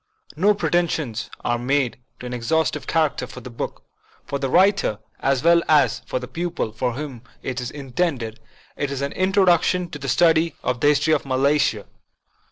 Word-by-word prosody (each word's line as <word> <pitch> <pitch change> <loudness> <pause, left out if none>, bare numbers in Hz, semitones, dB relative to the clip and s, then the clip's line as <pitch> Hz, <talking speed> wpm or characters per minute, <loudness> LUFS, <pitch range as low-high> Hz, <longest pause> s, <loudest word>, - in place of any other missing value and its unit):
No 200 +6 +3
pre 160 -6 -2
tensions 155 -9 0
are 120 0 0
made 130 0 0 0.2
to - - -8
an 125 - -5
exhaustive 130 +5 0
character 155 -4 +1
for - - -10
the 125 - -9
book. 115 - -5 0.4
For 140 - -3
the 135 -1 -1
writer, 190 - +3 0.2
as 135 -1 +1
well 170 0 +5
as 155 -1 +4
for - - -2
the 125 0 -5
pupil 170 -8 -3
for 125 +2 -2
whom 135 -3 -6 0.2
it 130 -1 -3
is 120 - -4
intended, 135 -5 -2 0.4
it 145 - -2
is 140 -1 -4
an 140 - -2
introduction 185 -2 +2
to 150 - -7
the 135 -1 -4
study 165 +2 +3
of 125 -1 -1
the 145 - +3
history 150 +2 +3
of 150 - +1
Malaysia. 140 +2 +1
145 Hz, 180 wpm, -22 LUFS, 125-165 Hz, 0.4 s, well